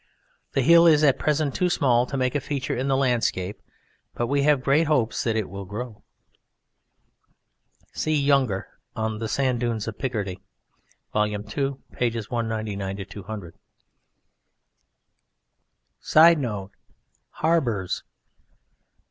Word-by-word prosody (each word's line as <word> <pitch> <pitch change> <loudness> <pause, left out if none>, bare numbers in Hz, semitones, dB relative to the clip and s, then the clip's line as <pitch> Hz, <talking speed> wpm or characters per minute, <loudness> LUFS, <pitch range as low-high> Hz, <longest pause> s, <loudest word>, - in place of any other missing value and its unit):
The 135 - +2
hill 170 +4 +7
is 155 -2 +5
at 140 -3 +4
present 150 -2 0
too 180 -1 +1
small 125 -7 +2
to 140 - -4
make 130 -1 0
a 145 - 0
feature 135 -1 -3
in 130 +3 -2
the 135 -1 +2
landscape, 115 -7 0 0.5
but 120 - -1
we 140 +3 +1
have 145 -2 +3
great 145 +4 +3
hopes 130 -7 +1
that 115 -2 0
it 110 -3 -1
will 100 +1 -7
grow. 105 +3 -7 1.9
(See 155 -1 0
Younger 135 -8 +2 0.3
on 110 -1 -2
"The 110 - -3
Sand 130 0 0
Dunes 115 -3 -2
of 115 - -6
Picardy," 105 -7 -3 0.7
Vol. 105 0 +2
II, 105 0 -3
pp. 120 -1 -3
199 105 -4 -3
200.) 100 -3 -8 2.5
[Sidenote: 135 - +4 0.6
Harbours. 125 - 0
120 Hz, 120 wpm, -24 LUFS, 105-140 Hz, 2.5 s, hill